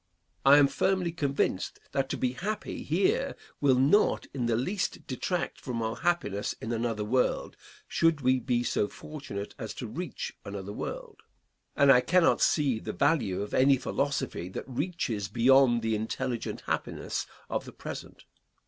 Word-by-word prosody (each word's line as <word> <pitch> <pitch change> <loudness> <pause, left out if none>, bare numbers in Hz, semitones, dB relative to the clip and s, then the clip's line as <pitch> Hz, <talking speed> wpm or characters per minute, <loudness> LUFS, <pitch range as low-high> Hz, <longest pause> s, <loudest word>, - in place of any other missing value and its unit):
I 140 +1 +8
am 145 - +7
firmly 185 +3 +1
convinced 140 - -1
that 135 -1 0
to - - -2
be 125 - 0
happy 200 +12 -4
here 435 +6 +1 0.2
will 135 -3 +4
not 145 +11 +3
in 125 -4 -1
the 115 - +2
least 185 - -2
detract 165 +6 -3
from 125 -4 -3
our 110 +1 -2
happiness 135 - 0
in 110 - -5
another 115 -2 -1
world 125 +4 0 0.3
should 165 -3 +2
we 130 0 +3
be 120 -2 0
so 110 -3 +1
fortunate 135 -11 -7
as - - -5
to - - -5
reach - - -5
another 100 0 -6
world; - - -6 0.5
and 140 -1 +6
I 125 -2 +7
cannot 175 +4 +3
see 140 -7 +3
the - - -5
value 125 - +1
of 105 - -8
any 135 +1 +5
philosophy 135 -10 -2
that 95 - -6
reaches 130 - -2
beyond 120 +2 +4
the 115 0 +1
intelligent 115 +3 -3
happiness - - -3 0.2
of - - -2
the - - -9
present. - - -8
130 Hz, 155 wpm, -29 LUFS, 115-150 Hz, 0.5 s, I